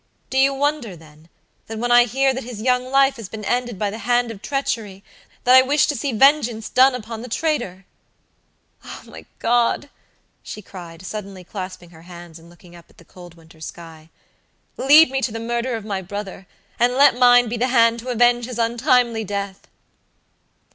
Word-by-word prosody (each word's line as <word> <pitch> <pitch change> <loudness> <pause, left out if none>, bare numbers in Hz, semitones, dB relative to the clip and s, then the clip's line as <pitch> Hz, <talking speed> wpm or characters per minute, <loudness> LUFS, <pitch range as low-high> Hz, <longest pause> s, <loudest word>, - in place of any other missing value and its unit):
Do 265 - +1
you 270 +1 +4
wonder, 275 -7 -2
then, 155 0 -18 0.4
that 225 - -7
when 240 +2 -2
I 240 0 +6
hear 265 +3 +1
that 260 - -5
his 235 -2 -8
young 250 +2 +1
life 270 +1 +2
has 220 -5 -9
been 215 -2 -8
ended 245 -2 -2
by 205 +1 -2
the 220 - -7
hand 240 +1 0
of 200 -3 -11
treachery, 225 -8 -4 0.4
that 250 - +4
I 260 - +9
wish 280 +2 +2
to 295 - -2
see 275 +2 -3
vengeance 240 -2 +2
done 260 0 +4
upon 225 -1 -7
the 250 - -8
traitor? 240 - -3 1.0
Oh, - - -10
my - - -13
God," 240 +4 0 0.5
she 210 - -9
cried, 175 -2 -11
suddenly 195 -2 -7
clasping 185 -2 -8
her 160 -1 -16
hands, 170 -1 -12
and 165 +1 -18
looking 175 0 -18
up 170 - -17
at - - -26
the 170 - -18
cold 175 -1 -14
winter 165 -1 -20
sky, 160 -1 -11 0.7
"lead 295 +2 +6
me 270 0 -1
to 255 - -1
the 225 - -6
murderer 235 +2 -2
of 215 - -10
my 200 -3 -3
brother, 195 0 -8 0.3
and 245 +1 +2
let 280 0 +5
mine 245 -1 +6
be 235 +2 -4
the 245 +3 0
hand 230 -2 +3
to 250 +2 -8
avenge 240 0 +2
his 250 -2 -7
untimely 235 -1 +1
death." 200 -1 -6
230 Hz, 190 wpm, -21 LUFS, 190-250 Hz, 1.0 s, I